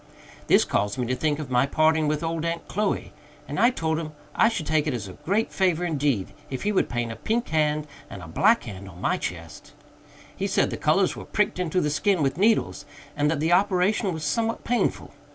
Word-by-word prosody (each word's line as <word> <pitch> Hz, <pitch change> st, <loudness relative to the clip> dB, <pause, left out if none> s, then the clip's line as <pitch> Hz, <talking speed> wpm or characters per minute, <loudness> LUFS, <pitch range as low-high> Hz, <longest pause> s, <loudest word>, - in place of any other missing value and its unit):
This -, -, +5 dB
caused 105 Hz, 0 st, -1 dB
me 125 Hz, -, -1 dB
to 130 Hz, +2 st, -1 dB
think 150 Hz, +2 st, 0 dB
of 145 Hz, -4 st, -6 dB
my 125 Hz, +2 st, +3 dB
parting 155 Hz, +1 st, +2 dB
with 150 Hz, +1 st, -1 dB
old 165 Hz, -1 st, -2 dB
Aunt 170 Hz, 0 st, -3 dB
Chloe, 210 Hz, +1 st, -2 dB, 0.3 s
and -, -, -4 dB
I 235 Hz, -, +6 dB
told 160 Hz, -9 st, -1 dB
him 155 Hz, -2 st, -6 dB, 0.2 s
I 225 Hz, -, +4 dB
should 205 Hz, -9 st, -3 dB
take 155 Hz, 0 st, +1 dB
it 140 Hz, -, 0 dB
as 110 Hz, -4 st, -5 dB
a 95 Hz, -, -9 dB
great 205 Hz, +6 st, -1 dB
favor 180 Hz, -3 st, +1 dB
indeed 145 Hz, -, 0 dB, 0.2 s
if 130 Hz, -, -5 dB
he 210 Hz, -, +1 dB
would 195 Hz, -, +1 dB
paint 120 Hz, -1 st, -2 dB
a -, -, -6 dB
pink 225 Hz, -, -2 dB
hand 150 Hz, -1 st, +1 dB, 0.2 s
and 95 Hz, -, -9 dB
a -, -, -9 dB
black 220 Hz, -, +3 dB
hand 100 Hz, -3 st, -8 dB
on 85 Hz, -1 st, -13 dB
my -, -, +1 dB
chest. 85 Hz, -2 st, -7 dB, 0.6 s
He -, -, -2 dB
said -, -, +1 dB
the -, -, -2 dB
colors -, -, +2 dB
were -, -, -8 dB
pricked 210 Hz, -2 st, 0 dB
into 180 Hz, 0 st, 0 dB
the 150 Hz, -, 0 dB
skin 180 Hz, +2 st, +1 dB
with 135 Hz, +4 st, -1 dB
needles, 220 Hz, +2 st, +2 dB, 0.3 s
and 145 Hz, 0 st, +1 dB
that 160 Hz, -2 st, 0 dB
the 160 Hz, +3 st, +2 dB
operation 190 Hz, +2 st, +2 dB
was 160 Hz, -2 st, -5 dB
somewhat 230 Hz, +8 st, -1 dB
painful. 245 Hz, 0 st, -1 dB
155 Hz, 225 wpm, -25 LUFS, 135-190 Hz, 0.6 s, I